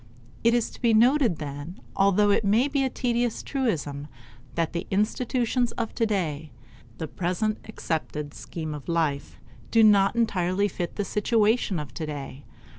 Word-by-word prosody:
It 230 +1 +4
is 235 -2 0
to - - -14
be 230 -3 +4
noted 245 - +4
then, 145 +4 -7 0.2
although 200 +1 +4
it 200 - +2
may 215 +7 +3
be 280 -1 0
a 265 - +1
tedious 240 -2 -1
truism, 150 - -2 0.5
that 165 -1 0
the 170 +1 -3
institutions 240 +4 0
of 230 -2 -3
today 170 -10 -1 0.5
the 160 - -4
present 185 +7 -1
accepted 155 -7 -4
scheme 160 -2 -6
of 150 0 -8
life 160 -4 -1 0.3
do 225 - +5
not 200 -1 +5
entirely 200 -4 +1
fit 175 -3 -4
the 205 - -2
situation 210 -2 +1
of 145 -5 -7
today. 145 -3 -6
200 Hz, 150 wpm, -26 LUFS, 160-230 Hz, 0.5 s, do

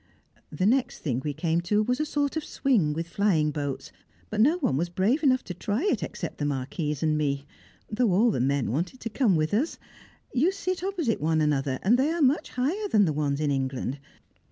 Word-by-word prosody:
The 185 - -1
next 250 +4 +1
thing 130 -4 -1
we 150 - -1
came 165 +3 0
to 210 +5 +1
was 250 +4 -1
a 305 - 0
sort 290 0 -1
of 315 - -2
swing 230 - +1
with 165 +2 -3
flying 170 -5 +1
boats, 140 -2 -4 0.4
but 215 0 +1
no 300 +9 +4
one 265 - 0
was 170 +5 -1
brave 200 - +1
enough 260 -4 +3
to 180 - -6
try 205 - -2
it 410 - +1
except - - -5
the 145 - -1
Marquise 145 +2 -2
and 155 -1 +2
me, 140 -2 -1 0.4
though 225 -1 +1
all 220 +6 +4
the - - -1
men 135 -1 +1
wanted 175 - -2
to 230 - -4
come 220 -5 +2
with 155 +2 0
us. 265 +10 0 0.6
You 290 +8 +3
sit 370 -2 -3
opposite 345 - -1
one 160 +1 +2
another, 140 -3 +1
and 235 +6 +4
they 280 +3 +3
are 335 +1 -1
much 275 +3 +2
higher 325 +12 -1
than 210 - +4
the 155 - 0
ones 145 -1 -1
in 150 -2 0
England. 135 0 -2
185 Hz, 215 wpm, -26 LUFS, -, 0.6 s, no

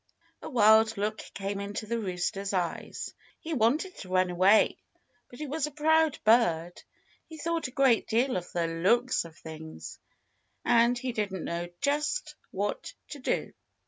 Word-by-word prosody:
A - - -7
wild 220 -3 +5
look 215 +2 -2 0.2
came 200 0 -3
into 205 +2 -4
the 230 +2 -2
rooster's 195 0 -3
eyes. 175 -3 -3 0.3
He 325 - -5
wanted 290 - +1
to 185 - -9
run 185 -1 +2
away. 190 +4 +4 0.5
But 245 - -13
he 305 - -5
was 300 +2 -2
a - - -8
proud 315 +1 +3
bird. 175 -7 +3 0.5
He 320 - -10
thought 335 0 -1
a - - -11
great 265 -4 +3
deal 245 +4 +1
of 180 -1 -4
the 170 -1 0
looks 190 +9 +1
of 165 -1 -13
things. 155 - -9 0.7
And 240 0 +4
he 255 +1 -3
didn't 200 -6 -3
know 170 +1 -3
just 300 - 0 0.2
what - - -3
to 290 - -8
do. 255 - -2
220 Hz, 160 wpm, -29 LUFS, 185-275 Hz, 0.7 s, wild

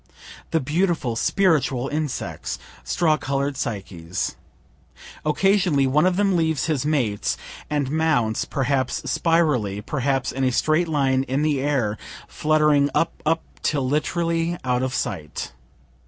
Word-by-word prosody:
The 165 - +2
beautiful, 155 -4 0
spiritual 145 -5 +2
insects! 150 -2 -3 0.3
straw 155 - +2
color'd 140 +1 -1
Psyches! 90 -7 -4 0.9
Occasionally 180 -2 +3
one 150 +6 +3
of 185 - +1
them 195 -1 +2
leaves 160 -3 +1
his 150 -3 0
mates, 120 -10 0 0.3
and 145 -3 -1
mounts, 150 -9 +1
perhaps 135 -2 -1
spirally, 150 - +1
perhaps 135 +2 -1
in 135 - -2
a 130 - +3
straight 155 +6 +2
line 135 -4 +2
in 135 +3 0
the 150 -3 +1
air, 130 -7 0 0.3
fluttering 150 -2 +3
up, 165 - 0
up, 165 +1 +2 0.2
till 140 -4 0
literally 165 +3 0
out 125 -1 +1
of 130 0 -1
sight. 80 -7 -4
145 Hz, 125 wpm, -23 LUFS, 130-160 Hz, 0.9 s, Occasionally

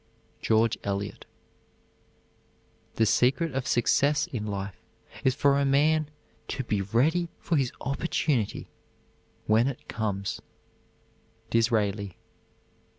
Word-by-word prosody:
GEORGE 110 0 +2
ELIOT. 100 0 -3 1.7
The 110 - +3
secret 135 +8 +2
of 130 -1 -2
success 145 +5 +3
in 110 -4 -5
life 100 -1 -5 0.4
is 130 -1 +3
for 140 0 +3
a - - +2
man 150 +2 +3 0.4
to 135 - -3
be 105 -4 -1
ready 145 - +1
for 170 - -1
his 135 -4 +1
opportunity 140 -4 -1 0.8
when 110 +3 +4
it 135 - -5
comes. 100 -3 -3 1.1
DISRAELI. 105 -4 +1
120 Hz, 100 wpm, -27 LUFS, 105-140 Hz, 1.7 s, when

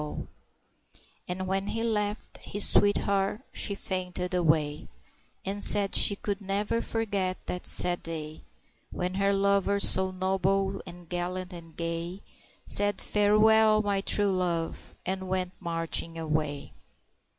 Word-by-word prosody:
And 185 +1 -5
when 195 +1 -3
he 225 +2 -4
left, 210 -2 -3
his 205 0 +1
sweetheart 200 +1 +1
she 200 - -3
fainted 180 -2 -4
away, 155 -4 0 0.6
And 200 +1 -2
said 200 -1 +8
she 200 - +6
could 200 0 -5
never 205 +4 -2
forget 200 -5 -3
the 180 - -4
sad 175 -1 +6
day 155 -2 -6 0.5
When 180 +1 -4
her 195 +1 0
lover 200 0 0
so 190 -1 +5
noble, 190 +1 -2
and 175 -1 -12
gallant 180 +2 -5
and 165 -2 -13
gay, 170 +3 -5 0.4
Said 205 0 +2
"Fare 210 0 +1
you 215 - +3
well, 220 -1 +4
my 200 -1 -1
true 205 0 +2
love!" 175 -3 -3
and 190 0 -4
went 185 -1 -2
marching 165 0 -2
away. 155 -3 -4
190 Hz, 130 wpm, -27 LUFS, 175-200 Hz, 0.6 s, said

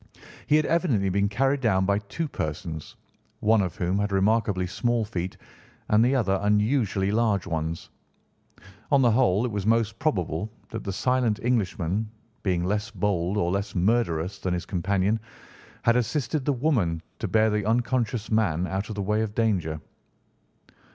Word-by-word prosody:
He 150 - +4
had 155 0 +3
evidently 140 - +1
been 100 +2 +1
carried 135 +6 +1
down 95 -6 +2
by 100 +1 +2
two 155 +10 -4
persons, 80 - -5 0.4
one 110 -2 +4
of 90 -3 -2
whom 90 +2 0
had 105 0 -1
remarkably 100 -1 +2
small 120 +5 0
feet 90 -2 -4 0.5
and 105 +1 +5
the 130 +3 +3
other 95 -7 +1
unusually 105 -1 +1
large 110 -3 +1
ones. 80 -2 -4 1.0
On 140 -2 +5
the 120 - +5
whole, 110 -2 +3
it 120 - -2
was 100 -1 -3
most 115 0 +1
probable 95 - -1 0.2
that - - -5
the 100 - -3
silent 125 +1 +1
Englishman, 105 -3 0 0.3
being 90 -3 0
less 105 +3 -1
bold 95 -1 -1
or 85 -3 +1
less 100 +2 -2
murderous 95 -2 +1
than 90 -1 -1
his 85 - -4
companion, 100 +3 0 0.6
had 115 - +4
assisted 130 +4 -1
the 145 - +2
woman 115 - 0 0.2
to - - -2
bear 110 0 +3
the 105 0 0
unconscious 120 -1 0
man 90 -6 +2
out 95 +3 -3
of 110 - -5
the 100 - -2
way 105 +2 +1
of 110 -1 -3
danger. 90 -9 0
105 Hz, 165 wpm, -26 LUFS, 95-115 Hz, 1.0 s, and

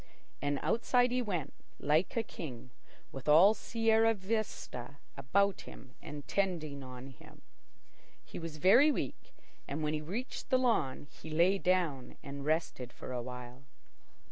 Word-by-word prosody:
And 145 0 0
outside 245 +1 +3
he 250 0 +1
went, 175 - -3 0.3
like 155 +9 +1
a 230 - +2
king, 130 - -8 0.4
with 135 +2 -5
all 175 +8 +8
Sierra 225 0 +2
Vista 190 - -4 0.2
about 195 +9 +1
him 130 -1 -13
and 145 -1 -8
tending 165 -8 -1
on 130 0 -9
him. 130 - -16 0.8
He - - -8
was 165 -2 -6
very 235 - +6
weak, - - -5 0.3
and 150 +3 -3
when 150 0 0
he 155 - -1
reached 205 - -5
the 260 - +5
lawn 220 - +1 0.2
he - - -8
lay 175 +5 +3
down 175 -9 0
and 140 0 -6
rested 155 -5 -1
for - - -9
a 125 - -2
while. 125 +1 -8
160 Hz, 145 wpm, -33 LUFS, 140-205 Hz, 0.8 s, all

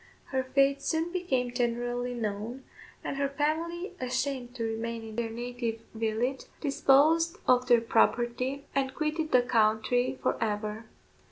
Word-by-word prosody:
Her 265 -1 +1
fate 275 +1 +2
soon 325 +3 -1
became 265 -10 -1
generally 245 0 -1
known, 225 +3 -4 0.4
and 275 - -3
her 280 0 +1
family, 330 +6 -1
ashamed 255 -1 -2
to 230 - -3
remain 225 +1 -3
in 220 -1 -8
their 235 -1 -1
native 235 0 -4
village, 225 +4 -1
disposed 315 +5 +4
of 250 0 +4
their 240 -2 +6
property, 240 +4 +1
and 265 -1 0
quitted 310 +1 -1
the 250 - +5
country 245 +2 +2
for - - +1
ever. 215 +1 -2
250 Hz, 140 wpm, -29 LUFS, 230-275 Hz, 0.4 s, their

